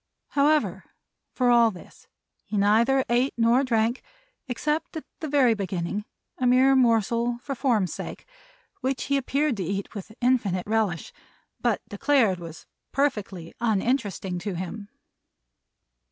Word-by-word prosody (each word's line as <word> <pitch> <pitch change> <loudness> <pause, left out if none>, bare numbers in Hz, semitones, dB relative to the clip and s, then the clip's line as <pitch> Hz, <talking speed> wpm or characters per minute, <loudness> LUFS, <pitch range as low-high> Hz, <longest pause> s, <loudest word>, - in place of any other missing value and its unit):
However, 295 +2 +2 0.5
for 250 -1 +2
all 235 -1 +6
this, 185 -5 -13 0.4
he 210 - -4
neither 230 +7 +3
ate 245 +3 +1
nor 235 +3 +4
drank, 235 -1 +1 0.5
except 300 +6 -2
at 315 - -7
the 315 - -4
very 275 -5 +4
beginning, 195 0 -3 0.3
a 255 - +2
mere 260 +2 +5
morsel 235 -1 +2
for 280 - -3
form's 235 -8 +1
sake, - - -7 0.5
which 260 0 -2
he 280 - 0
appeared 275 -1 0
to 190 - -2
eat 195 +3 -4
with 205 0 -8
infinite 230 -8 +1
relish, 210 -5 -1 0.5
but - - 0
declared 230 -11 +2
was 165 -2 -10 0.3
perfectly 210 - -2
uninteresting 210 -4 0
to 195 +1 -4
him. 200 +4 -6
230 Hz, 130 wpm, -25 LUFS, 200-260 Hz, 0.5 s, all